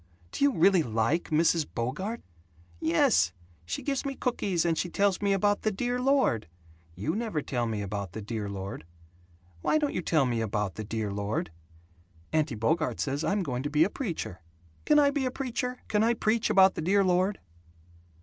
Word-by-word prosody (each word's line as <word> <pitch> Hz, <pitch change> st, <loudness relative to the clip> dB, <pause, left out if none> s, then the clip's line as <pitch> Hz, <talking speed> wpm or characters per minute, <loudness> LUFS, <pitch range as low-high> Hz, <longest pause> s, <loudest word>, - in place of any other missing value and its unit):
Do -, -, -2 dB
you 285 Hz, -, +5 dB
really 190 Hz, -3 st, +4 dB
like 115 Hz, +6 st, 0 dB
Mrs. 160 Hz, 0 st, +2 dB
Bogart?" 150 Hz, -, -3 dB, 0.6 s
"Yes. 90 Hz, -, +3 dB, 0.3 s
She -, -, -4 dB
gives 275 Hz, -2 st, -1 dB
me 275 Hz, -1 st, -3 dB
cookies 195 Hz, -10 st, -1 dB
and 165 Hz, -1 st, +2 dB
she 175 Hz, -, -2 dB
tells 200 Hz, +1 st, +1 dB
me 200 Hz, -1 st, +2 dB
about 205 Hz, +1 st, +2 dB
the 215 Hz, -, +1 dB
Dear 245 Hz, +5 st, -2 dB
Lord. 260 Hz, -, +2 dB, 0.5 s
You 140 Hz, -, -2 dB
never 220 Hz, -8 st, -2 dB
tell 120 Hz, -3 st, -1 dB
me 110 Hz, -2 st, -2 dB
about 100 Hz, -2 st, -4 dB
the 110 Hz, -, -5 dB
Dear 105 Hz, -1 st, -4 dB
Lord. 95 Hz, -3 st, -6 dB, 0.8 s
Why -, -, +2 dB
don't 295 Hz, -2 st, 0 dB
you -, -, -1 dB
tell 155 Hz, -4 st, +2 dB
me 120 Hz, -2 st, 0 dB
about 105 Hz, -3 st, -1 dB
the 110 Hz, -, -6 dB
Dear 110 Hz, -1 st, -3 dB
Lord? 100 Hz, -4 st, -2 dB, 0.8 s
Auntie 155 Hz, -5 st, +1 dB
Bogart 155 Hz, +9 st, 0 dB
says 140 Hz, +2 st, -1 dB
I'm 200 Hz, -1 st, +1 dB
going 125 Hz, -6 st, -3 dB
to 145 Hz, -, -3 dB
be 150 Hz, +1 st, +4 dB
a 195 Hz, -, 0 dB
preacher. 170 Hz, -, -4 dB, 0.4 s
Can 300 Hz, -, +5 dB
I 285 Hz, -1 st, +5 dB
be 280 Hz, -2 st, -1 dB
a -, -, +1 dB
preacher? 250 Hz, -1 st, -4 dB
Can 210 Hz, -, +1 dB
I 235 Hz, +1 st, +3 dB
preach 220 Hz, 0 st, +1 dB
about 190 Hz, 0 st, +6 dB
the -, -, -4 dB
Dear 195 Hz, +5 st, +3 dB
Lord?" 185 Hz, +2 st, +1 dB
165 Hz, 190 wpm, -28 LUFS, -, 0.8 s, about